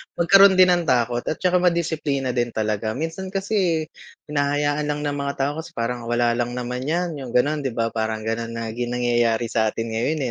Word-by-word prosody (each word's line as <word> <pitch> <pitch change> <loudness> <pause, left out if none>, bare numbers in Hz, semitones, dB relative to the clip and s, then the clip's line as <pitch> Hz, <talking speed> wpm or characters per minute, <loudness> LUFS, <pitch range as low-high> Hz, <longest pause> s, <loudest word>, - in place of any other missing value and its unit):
magkaroon 195 +3 +6
din 185 -1 +6
ng 175 -2 +1
takot 120 -1 +2
at 155 - 0
saka 180 -1 +2
madisiplina 160 -7 0
din 120 -1 0
talaga. 110 0 -1
Minsan 165 +6 -4
kasi 190 -4 0 0.5
hinahayaan 145 +1 0
lang 150 0 -2
ng 145 -1 -2
mga 140 0 -2
tao 140 +1 0
kasi 160 - -9
parang 115 0 -3
wala 120 0 +2
lang 120 +1 -2
naman 125 +2 -4
yan, 170 -2 -1
yung 125 -3 -7
ganon 150 +5 +2
'di 135 -4 -4
ba 115 -1 0
parang 110 -1 -2
ganun 115 +1 -3
lagi 115 +1 -4
nangyayari 120 -1 0
sa 110 -1 +2
atin 115 +1 -3
ngayon, 125 +8 -1
130 Hz, 190 wpm, -22 LUFS, 115-160 Hz, 0.5 s, magkaroon